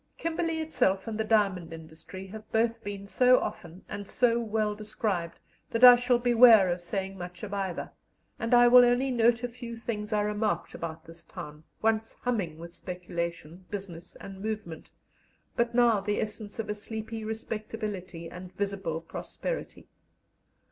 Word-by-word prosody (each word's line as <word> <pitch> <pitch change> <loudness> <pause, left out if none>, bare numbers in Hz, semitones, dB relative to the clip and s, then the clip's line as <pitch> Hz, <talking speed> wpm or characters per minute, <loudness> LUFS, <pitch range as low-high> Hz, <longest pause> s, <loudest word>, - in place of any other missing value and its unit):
Kimberley 330 0 -1
itself 195 -12 +1
and 225 - -3
the 220 - 0
diamond 200 -6 +1
industry 165 +4 -10
have 215 +2 -11
both 225 0 +1
been 200 -1 -6
so 250 +4 +5
often 170 +2 -6
and 205 -1 -6
so 235 +1 +2
well 215 -2 0
described 205 -5 -3 0.3
that 230 +2 -1
I 250 -1 +12
shall 245 0 +2
beware 235 -5 +7
of 175 0 -1
saying 195 +2 -4
much 180 +1 -8
of 205 -1 -5
either, 190 -3 -3 0.5
and 230 +2 +2
I 240 0 +7
will 250 +1 +9
only 245 +2 +3
note 235 0 +3
a - - +1
few 240 -1 -8
things 215 -2 -4
I 210 -1 +2
remarked 210 +1 -1
about 165 -1 -6
this 165 0 -13
town, 150 +1 -10 0.2
once 225 0 +1
humming 200 -11 -2
with 170 +1 -10
speculation, 170 -1 -5
business, 180 -4 -7
and 195 -1 -10
movement, 210 -7 -5 0.7
but 235 0 0
now 235 -4 +4
the 205 +1 -1
essence 210 -1 -5
of 225 -2 -3
a 210 - -1
sleepy 220 +1 -6
respectability 215 -5 -5
and 180 +2 -9
visible 195 -5 -3
prosperity. - - -6
210 Hz, 160 wpm, -29 LUFS, 180-230 Hz, 0.7 s, I